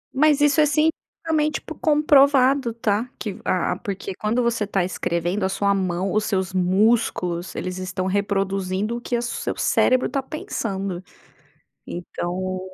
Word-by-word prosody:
Mas 295 0 +4
isso 295 +1 +4
é - - +6
cientificamente 310 0 0
po 320 - -8
comprovado 280 -4 +4
tá, 225 +1 -1
que 205 -4 -5
a 185 - 0
a - - 0
porque 195 -1 -5
quando 225 +5 0
você 230 -3 0
tá 195 -3 0
escrevendo 175 +2 -2
a 190 - +1
sua 200 +1 +1
mão, 185 -1 -1
os 215 0 +1
seus 190 -1 -1
músculos 185 -2 +1
eles 185 0 -4
estão 185 0 -3
reproduzindo 195 +1 -1
o 240 - -8
que 245 - -2
a 235 - +1
o - - -3
seu 240 - -3
cérebro 255 0 +3
tá 275 - -1
pensando. 195 - -4 0.9
Então 185 +1 -4
200 Hz, 155 wpm, -23 LUFS, 185-255 Hz, 0.9 s, é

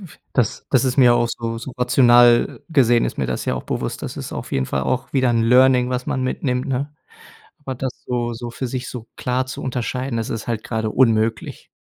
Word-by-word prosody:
f - - -26
das 120 -6 -1
das 130 -1 +3
ist 130 -1 0
mir 125 -3 +6
auch 120 - +2
so 115 -1 -4
so 120 +3 -8
rational 120 -1 +4
gesehen 120 -7 +3
ist - - -4
mir - - 0
das - - -3
ja - - 0
auch - - -6
bewusst. - - -3
Das - - -6
ist - - -6
auf - - -7
jeden 65 -1 0
Fall 65 - -2
auch 125 - -2
wieder 130 -3 +2
'n 115 -1 +2
Learning, 125 +1 +4
was 125 0 -2
man 130 - -1
mitnimmt, 130 0 -1
ne? 140 +3 -2 0.6
Aber 135 -3 -6
das 130 +1 -3 0.2
so 120 -1 -1
so 120 +1 -6
für 130 +3 -4
sich 125 0 -4
so 120 -3 -8
klar 125 +1 -1
zu 130 - -7
unterscheiden, 125 0 -3
das 115 -1 -3
ist 115 +1 -5
halt 115 -2 -2
gerade 110 -1 -2
unmöglich. 115 -2 +1
125 Hz, 225 wpm, -21 LUFS, 115-130 Hz, 0.6 s, mir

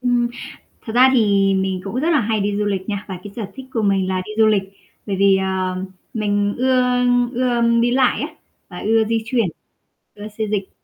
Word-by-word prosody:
Ừm, 245 -1 +1 0.6
thật 220 - -5
ra 255 +1 +7
thì 200 -4 +3
mình 190 -1 -1
cũng 200 +4 -6
rất 305 +6 0
là 305 -5 +3
hay 220 0 0
đi 200 0 -1
du 210 - 0
lịch 195 0 -2
nha. 205 -1 -3
Và 190 -2 -5
cái 205 - -9
sở 225 -4 -4
thích 265 -1 -9
của 225 - 0
mình 195 -2 +1
là 185 0 -1
đi - - -8
du 220 - +5
lịch, 205 -3 +2 0.4
bởi 200 - -2
vì, 195 0 +4
ờ, 190 -1 -1 0.4
mình 205 -2 0
ưa 255 0 +2 0.5
ưa 245 -1 0 0.2
đi 240 +1 +2
lại 255 0 +2
á, 295 - -2 0.4
và 180 - -9
ưa 225 +1 +2
di 225 0 -1
chuyển, 230 -1 +1 0.7
ưa 210 0 -8
xê 220 - 0
dịch. 200 -2 -2
210 Hz, 215 wpm, -20 LUFS, 195-240 Hz, 0.7 s, ra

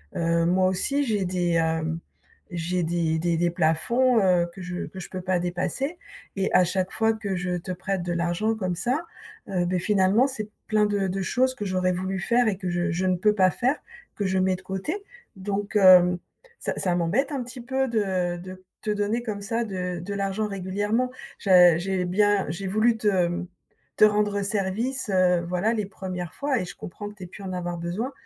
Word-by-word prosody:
heu, 170 0 +1
moi 185 +1 +3
aussi, 275 +10 0
j'ai 210 -6 0
des, 175 -2 +1
heu, 160 0 0 0.5
j'ai 175 +1 -1
des 160 -1 0
des 170 0 +1
des 175 +1 +2
plafonds, 200 +10 +2
heu, 175 -2 +3
que 190 - -10
je 180 0 -4
que 190 - -9
je - - -8
peux 185 - -5
pas 185 -1 0
dépasser, 185 - -2 0.4
et 195 - +1
à 185 - +6
chaque 185 +1 -1
fois 225 0 +2
que 205 -3 -3
je 180 0 -2
te 180 +2 -6
prête 185 0 -3
de 175 0 -2
l'argent 175 +6 0
comme 185 -4 -2
ça, 250 - 0 0.5
heu, 180 -2 0
beh, 180 0 0
finalement, 205 +6 +3
c'est 220 -6 -5 0.2
plein 215 -1 +3
de 200 -2 0
de 195 +1 -2
choses 255 +5 +1
que 205 - -5
j'aurais 185 -1 +1
voulu 190 +1 -2
faire 240 +3 +3
et 200 - +1
que 185 -3 -4
je 175 +1 0
je 180 +3 -1
ne 185 - +3
peux 210 +3 +3
pas 185 -2 +4
faire, 255 +4 +1 0.4
que 205 - -2
je 190 0 +1
mets 185 0 +2
de 185 - -11
côté. 195 - -4 0.3
Donc 200 +2 -4
heu, 180 -2 +7 0.4
ça - - -2
ça 180 -2 0
m'embête 200 - +1
un 260 -3 -2
petit 250 +1 -9
peu 265 +2 -1
de 185 -5 0
de 185 +1 -10 0.2
te 215 - -1
donner 210 +3 -1
comme 210 -3 -4
ça, 230 +3 -1
de 180 -3 -3
de 200 +4 -5
l'argent 200 +2 -1
régulièrement. 205 +6 -1 0.3
Ja 180 -4 +6
j'ai 185 0 -1
bien 205 +2 +2
j'ai 190 +4 -4
voulu 220 +4 +3
te 180 -4 +1 0.5
te - - +5
rendre 210 -1 +2
service, 210 +5 -1
heu, 180 -2 +3
voilà 180 +5 +1
les 210 -3 -1
1ères 180 -3 -6
fois 280 -4 0
et 185 - -3
je - - -9
comprends 205 +4 -8
que - - -12
tu 190 - -10
aies - - -7
pu 200 +3 -11
en 185 -1 -4
avoir 175 -1 -3
besoin. 180 +10 -3
190 Hz, 210 wpm, -25 LUFS, 180-210 Hz, 0.5 s, heu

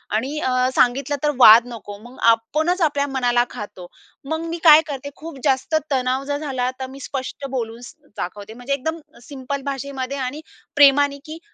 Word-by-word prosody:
आणि 270 +7 -2
अ, 260 - -1 0.2
सांगितलं 265 +3 +2
तर 300 - +2
वाद 230 -1 +9
नको, 215 -4 -9
मग 245 +2 -14
आपणच 310 +11 +1
आपल्या 290 -3 +1
मनाला 245 -3 +1
खातो. 190 -4 -9 0.4
मग 320 +1 -2
मी 335 - -3
काय 310 -2 +9
करते, 285 -1 -6
खूप 315 -3 -10
जास्त 270 +2 +1 0.2
तणाव 260 0 0
जर 285 - 0
झाला 265 -4 -2
तर 260 - -4
मी 270 +1 -11
स्पष्ट 275 0 -6
बोलून 235 -3 -4 0.4
दाखवते, 205 +3 -6
म्हणजे 245 +4 -4
एकदम 320 +4 -3 0.2
सिंपल 275 +1 -6
भाषेमध्ये 275 -1 -4
आणि 270 +3 -4 0.3
प्रेमाने, 285 0 +5
की 315 +1 -8
270 Hz, 165 wpm, -21 LUFS, 245-290 Hz, 0.4 s, वाद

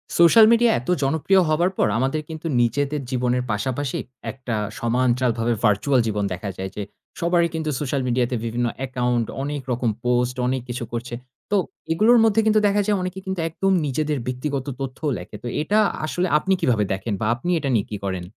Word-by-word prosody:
Social 195 +6 +7
media 235 0 +5
এত 125 - -9
জনপ্রিয় 160 +7 +3
হবার 170 +4 +2
পর - - +3
আমাদের 135 +5 0
কিন্তু 160 +1 -6
নিজেদের 140 +5 0
জীবনের 125 0 0
পাশাপাশি 130 +6 -2 0.3
একটা 130 -3 -5 0.2
সোমান্চালভাবে 120 -1 +1
virtual 105 +6 +3
জীবন 105 -1 -1
দেখা 100 +3 -5
যায় 95 0 -5
যে, - - -4 0.4
সবারই 170 0 +2
কিন্তু 160 -1 -2
social 140 -1 -1
media 125 0 +2
তে - - 0
বিভিন্ন 120 +1 -1 0.2
account, 125 -2 0 0.2
অনেক 145 0 -3
রকম 120 -1 0 0.2
post, 125 0 +1
অনেক 130 0 0
কিছু 120 0 -3
করছে। 120 +1 -4 0.4
তো 205 - +4 0.3
এগুলোর 220 +9 +5
মধ্যে 225 0 +3
কিন্তু 215 0 +4
দেখা 205 +1 +2
যায় 210 -1 +2
অনেকে 185 +1 -4
কিন্তু 190 -1 -3
একদম 195 +4 0
নিজেদের 150 +2 -1
ব্যক্তিগত 130 +1 -3
তথ্যও 135 +3 -3
লেখে। 90 +4 -9
তো - - -4
এটা 205 +7 +2 0.3
আসলে 175 +4 -1
আপনি 190 +5 +1
কিভাবে 115 -4 +2
দেখেন 100 +3 -3
বা - - 0
আপনি 130 +8 -5
এটা 140 - -2
নিয়ে 105 -4 +1
কি 105 - -3
করেন? 95 -2 -3
130 Hz, 185 wpm, -22 LUFS, 120-165 Hz, 0.4 s, Social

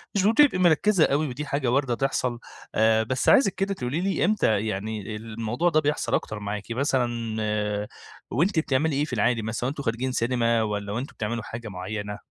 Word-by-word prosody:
مش 195 - +2
بتبقي 225 +3 +5
مركزة 180 +1 +4
أوي، 150 +3 +1
ودي 140 +3 -5
حاجة 140 -2 -1
واردة 130 -2 +1
تحصل. 125 -2 -1 0.4
آآ، 110 0 +4
بس 130 +3 0
عايزِك 205 -7 +5
كده 195 +1 -1
تقولي 140 -1 -3
لي 190 -2 +1
إمتى 110 - +2
يعني 105 +1 -4
الموضوع 115 +8 -2
ده 155 -2 +3
بيحصل 150 -1 -1
أكتر 110 - -1
معاكِ 105 +1 -5
مثلًا 130 0 +1 1.2
وأنتِ 165 - +2
بتعملي 150 0 +1
إيه 145 +2 +1
في 150 - -8
العادي 115 +1 +2
مثلًا، 110 +3 -2
وأنتم 140 +1 -4
خارجين 120 +2 -1
سينما 115 -2 +1
والّا 105 -1 -3
وأنتم 120 +7 -4
بتعملوا 110 +1 -3
حاجة 115 +2 -7
معيّنة؟ 105 +2 -5
125 Hz, 175 wpm, -25 LUFS, 110-150 Hz, 1.2 s, بتبقي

